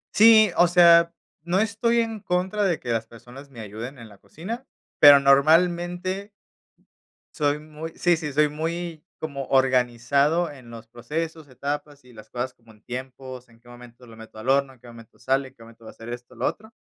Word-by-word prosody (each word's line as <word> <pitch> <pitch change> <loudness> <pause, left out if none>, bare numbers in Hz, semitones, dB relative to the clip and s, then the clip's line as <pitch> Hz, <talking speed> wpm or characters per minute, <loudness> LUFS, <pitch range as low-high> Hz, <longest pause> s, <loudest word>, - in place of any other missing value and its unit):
Sí, 220 -2 +7
o 175 - +6
sea, 170 -1 +6 0.3
no 175 +3 -1
estoy 225 +2 +1
en 225 -1 -4
contra 185 +3 -1
de 175 -4 0
que 120 - -9
las 115 -1 -2
personas 125 +5 -14
me 120 -4 -11
ayuden 115 +6 -8
en 115 -3 -12
la 100 - -18
cocina, 225 - -8 0.4
pero 145 -1 +9
normalmente 175 +7 +2 1.1
soy 145 -3 0
muy 155 +1 -9
Sí, 175 -1 +2
sí, 155 -3 -5
soy 150 +2 +3
muy 165 +2 -5 0.2
como 140 -4 -5
organizado 135 +5 +1
en 130 -5 -14
los 115 -1 -11
procesos, 155 +6 -6
etapas 145 +1 -6
y 125 - -17
las 110 -1 -14
cosas 125 +1 -4
como 115 -1 -21
en 105 - -25
tiempos, 130 0 -8
en 115 0 -22
qué 120 - -25
momento 120 0 -15
lo 115 -2 -14
meto 110 -1 -13
al 115 +5 -5
horno, 135 0 +2
en 125 - -23
qué 125 - -21
momento 115 -1 -15
sale, 135 0 -1
en 130 - -19
qué 115 - -16
momento 115 0 -17
va - - -9
a - - -12
ser 115 +1 -11
esto, 120 +1 -9
lo 120 - -3
otro, 220 +1 -4
140 Hz, 200 wpm, -24 LUFS, 120-170 Hz, 1.1 s, pero